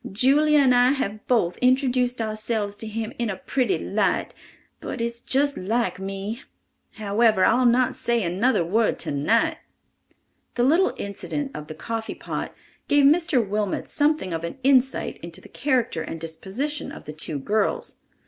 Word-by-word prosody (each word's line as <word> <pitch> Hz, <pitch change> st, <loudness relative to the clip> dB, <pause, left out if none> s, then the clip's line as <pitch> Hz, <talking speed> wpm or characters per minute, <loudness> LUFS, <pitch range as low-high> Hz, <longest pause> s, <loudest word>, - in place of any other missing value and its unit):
Julia 285 Hz, +8 st, +4 dB
and 270 Hz, -3 st, +5 dB
I 245 Hz, +2 st, +5 dB
have 215 Hz, -6 st, -4 dB
both 210 Hz, -9 st, +1 dB
introduced 250 Hz, -2 st, +2 dB
ourselves 215 Hz, -1 st, -2 dB
to 220 Hz, -, -6 dB
him 220 Hz, +2 st, -4 dB
in 235 Hz, -2 st, 0 dB
a 195 Hz, -, -2 dB
pretty 265 Hz, -, 0 dB
light, -, -, 0 dB, 0.5 s
but 260 Hz, -, -6 dB
it's 235 Hz, 0 st, -3 dB
just 280 Hz, +1 st, +1 dB
like 220 Hz, +1 st, -1 dB
me—however, 205 Hz, +1 st, -1 dB
I'll 245 Hz, +2 st, +4 dB
not 245 Hz, +1 st, +3 dB
say 235 Hz, -2 st, 0 dB
another 185 Hz, +3 st, +1 dB
word 220 Hz, +6 st, +1 dB
tonight!" 230 Hz, -, +1 dB, 1.0 s
The 240 Hz, -, +1 dB
little 325 Hz, +9 st, +3 dB
incident 270 Hz, +8 st, -4 dB
of 150 Hz, -, -7 dB
the 155 Hz, -, -8 dB
coffee 225 Hz, +6 st, -4 dB
pot -, -, -5 dB, 0.4 s
gave 285 Hz, -1 st, +4 dB
Mr. 290 Hz, -, +3 dB
Wilmot 205 Hz, -1 st, -2 dB
something 295 Hz, -, +1 dB
of 165 Hz, 0 st, -3 dB
an 170 Hz, -, -5 dB
insight 265 Hz, -1 st, +2 dB
into -, -, -8 dB
the -, -, -15 dB
character 250 Hz, -, 0 dB
and 165 Hz, -, -6 dB
disposition 195 Hz, -, -4 dB
of -, -, -10 dB
the 150 Hz, -, -8 dB
two 155 Hz, 0 st, -3 dB
girls. 205 Hz, +9 st, -1 dB
230 Hz, 155 wpm, -24 LUFS, 200-265 Hz, 1.0 s, and